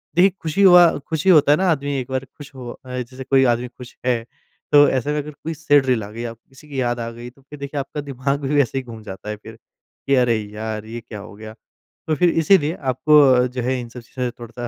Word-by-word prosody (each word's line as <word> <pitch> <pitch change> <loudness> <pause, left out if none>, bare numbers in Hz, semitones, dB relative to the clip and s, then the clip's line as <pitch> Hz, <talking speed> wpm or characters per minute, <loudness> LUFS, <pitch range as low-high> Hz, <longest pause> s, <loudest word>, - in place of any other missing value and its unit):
देखिए 180 +3 +6
खुशी 160 +4 -1
हुआ 180 -2 +8 0.2
खुश 160 0 -3
ही 190 - +6
होता 150 -4 +5
है 150 - +5
ना 190 0 +1
आदमी 145 -2 -1
एक 125 - -6
बार 130 0 -2
खुश 145 -2 -12
हो 125 -2 -8
अ, 130 -1 -9
जैसे 130 +2 -7
कोई 135 0 +3
आदमी 120 +1 -5
खुश 125 0 -13
है 120 -3 +1 0.5
तो 145 -1 +7
ऐसे 135 +2 -1
में 150 - -1
अगर 150 0 -4
कोई 160 +3 -7
सैड 145 -3 +3
रील 125 -4 +1
आ 100 - -8
गई 115 +2 -7
आपको 115 - -18
किसी 135 +3 -17
की 135 -2 -3
याद 120 -1 -1
आ 115 0 -4
गई 120 +1 -9
तो 130 +3 -24
फ़िर 145 +2 -13
देखिए 140 +1 -4
आपका 140 +2 -5
दिमाग 140 0 -2
भी 140 +1 -1
वैसे 135 -2 +2
ही 135 - -2
घूम 115 -3 -10
जाता 95 +1 -8
है 105 - -3
फ़िर, 110 +1 -13 0.5
कि 140 - +4
अरे 125 -2 +3
यार! 105 +1 -6
ये 115 +2 -7
क्या 110 -2 -9
हो 105 +1 -11
गया? 110 +1 -10 0.5
तो 155 - +1
फ़िर 175 +3 +3
इसीलिए 165 -1 +3 0.2
आपको 150 +4 +4
अ, 125 0 +3
जो 125 0 -5
है 130 +1 -1
इन 120 - -9
सब 125 - -10
चीज़ों 125 +1 -4
से - - -8
थोड़ा-सा 120 +1 -7
130 Hz, 265 wpm, -21 LUFS, 120-145 Hz, 0.5 s, हुआ